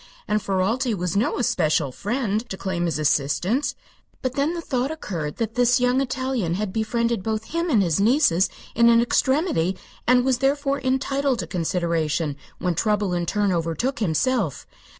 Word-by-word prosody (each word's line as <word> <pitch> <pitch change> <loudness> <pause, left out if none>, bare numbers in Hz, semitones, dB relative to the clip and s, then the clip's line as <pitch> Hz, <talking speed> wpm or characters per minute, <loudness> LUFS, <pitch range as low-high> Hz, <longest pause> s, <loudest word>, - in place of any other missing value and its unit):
And 210 0 +1
Ferralti 210 +5 0
was 180 0 -2
no 210 +4 +1
especial 155 - +1
friend, 220 - -2
to 190 - -5
claim 180 -3 -2
his 165 -4 -1
assistance. 155 - +1 0.5
But 255 -1 -1
then 285 +5 0
the - - -3
thought 260 -4 -1
occurred 175 - -4
that 225 -1 -2
this 245 +1 +3
young 250 +2 +2
Italian 255 -9 -1
had 200 -1 -3
befriended 230 0 0
both 220 +2 -2
him 335 +1 0
and 220 -9 +4
his 165 -2 +1
nieces 205 - +3 0.2
in 235 +1 +5
an 230 0 +6
extremity, 240 - +1 0.3
and 250 0 +4
was 260 -2 +2
therefore 275 +1 +1
entitled 265 +1 0
to - - -3
consideration 165 -4 -1 0.2
when 180 -1 -1
trouble 205 +1 0
in 175 -1 -1
turn 205 +1 +1
overtook 175 - -1
himself. 205 - 0
220 Hz, 165 wpm, -23 LUFS, 180-255 Hz, 0.5 s, an